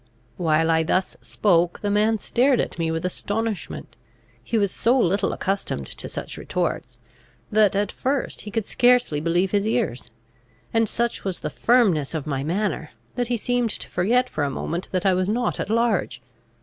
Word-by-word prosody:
While 165 -1 +2
I 160 0 +3
thus 185 +3 0
spoke, 175 -4 +1
the 205 - 0
man 215 +2 +3
stared 250 +5 +2
at - - -2
me 165 -1 0
with 160 +2 -2
astonishment. 210 +3 -3 0.5
He 230 - -1
was 200 -3 +1
so 240 +4 +2
little 195 -4 +2
accustomed 195 - -2
to - - -8
such - - -6
retorts, 165 -8 -3 0.5
that, 210 -2 +4
at 205 0 0
first, 270 0 -2
he 210 - -8
could 220 0 -2
scarcely 245 - +3
believe 175 +4 +1
his 205 0 +1
ears; 220 - -1 0.6
and 225 -2 +2
such 235 0 -1
was 190 -3 -3
the - - -3
firmness 190 - +2
of 155 - -3
my 135 -3 -2
manner, 175 -1 -2 0.2
that 245 -1 -1
he 240 0 0
seemed 245 +1 0
to - - -4
forget 240 +8 +2
for 155 - -3
a 140 - 0
moment 170 +6 -4
that 185 +1 -1
I 190 - +5
was 185 +1 0
not 240 +3 0
at - - -3
large. 220 - +1
200 Hz, 180 wpm, -23 LUFS, 170-230 Hz, 0.6 s, I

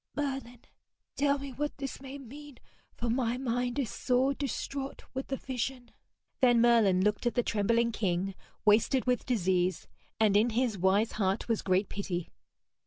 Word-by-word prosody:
Merlin, 270 -4 -3 0.5
tell 285 0 +2
me 275 -1 -7
what 295 +3 -3
this 275 -1 -5
may 275 +1 -7
mean, 280 +1 -11 0.4
for 235 - -3
my 240 0 0
mind 245 0 -1
is 260 -7 -1
sore 260 +2 +1
distraught 275 0 -4
with 265 0 -4
the 270 - -2
vision.' 250 -1 -4 0.5
Then 245 -2 +5
Merlin 225 -6 +4
looked 210 +3 +1
at 240 - -1
the 245 - +2
trembling 230 +3 +1
king, 195 -3 -1 0.3
wasted 220 +5 +4
with 250 -1 0
disease, 185 -6 +1 0.3
and 215 -2 +4
in 215 +4 +4
his 240 -1 0
wise 195 +4 +2
heart 195 +3 0
was 230 -3 0
great 190 +1 +1
pity. 180 -4 -4
240 Hz, 160 wpm, -30 LUFS, 210-265 Hz, 0.5 s, Then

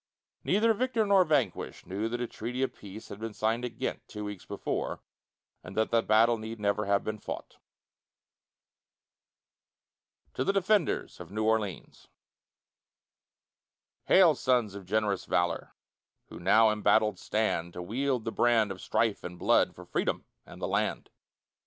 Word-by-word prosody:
Neither 225 +2 +3
victor 235 -1 0
nor 200 -2 +5
vanquished 155 -3 -1
knew 105 +4 -3
that 120 +1 -3
a 120 - -1
treaty 125 +3 -4
of 135 - -1
peace 105 +2 -11
had 100 - -8
been 110 -1 -6
signed 115 +3 0
at 115 -2 -5
Ghent 130 - -3
two 105 -1 -6
weeks 105 -3 -7
before, - - -3 0.6
and - - -10
that 110 - +1
the 115 - +4
battle 115 +2 +4
need 110 +1 -7
never 105 0 0
have 100 0 +2
been 110 0 -4
fought. - - -7 2.8
TO 130 - -1
THE 195 - +1
DEFENDERS 195 -2 +1
OF - - -9
NEW 110 +3 -2
ORLEANS 110 -5 -2 2.0
Hail 180 -4 +6
sons 125 -6 +1
of 100 -2 -9
generous 105 -1 0
valor, 90 -1 -1 0.5
Who - - -9
now 110 +5 +5
embattled 105 0 +2
stand, 95 -6 -1
To 90 - -6
wield 125 +4 -1
the 115 - -2
brand 115 -4 +3
of 95 - -7
strife 115 -3 0
and 90 0 -7
blood, - - +3
For - - -11
Freedom - - -1 0.2
and - - -12
the - - -2
land. - - -1
110 Hz, 150 wpm, -29 LUFS, 105-125 Hz, 2.8 s, Hail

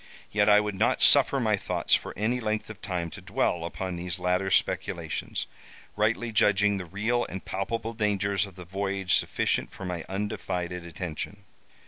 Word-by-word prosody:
Yet 105 0 +3
I 105 0 +8
would 105 0 -1
not 95 - +2
suffer - - +6
my - - +3
thoughts - - -1
for - - +3
any 115 +5 +1
length 110 -1 -2
of 110 - -12
time 90 -5 -3
to - - -9
dwell 85 -2 0
upon 90 +3 -4
these 90 0 -3
latter 90 +1 +1
speculations, - - 0 0.5
rightly 110 +3 +1
judging 105 -1 +4
the 90 - -5
real 110 +7 0
and 95 +1 -7
palpable 115 +4 -3
dangers 100 -2 +1
of 95 - -14
the 90 -2 -9
voyage 95 +1 -1
sufficient - - +1
for 95 - -8
my 90 -2 -3
undivided 90 -3 -3
attention. 90 +4 -5
100 Hz, 165 wpm, -28 LUFS, 90-105 Hz, 0.5 s, I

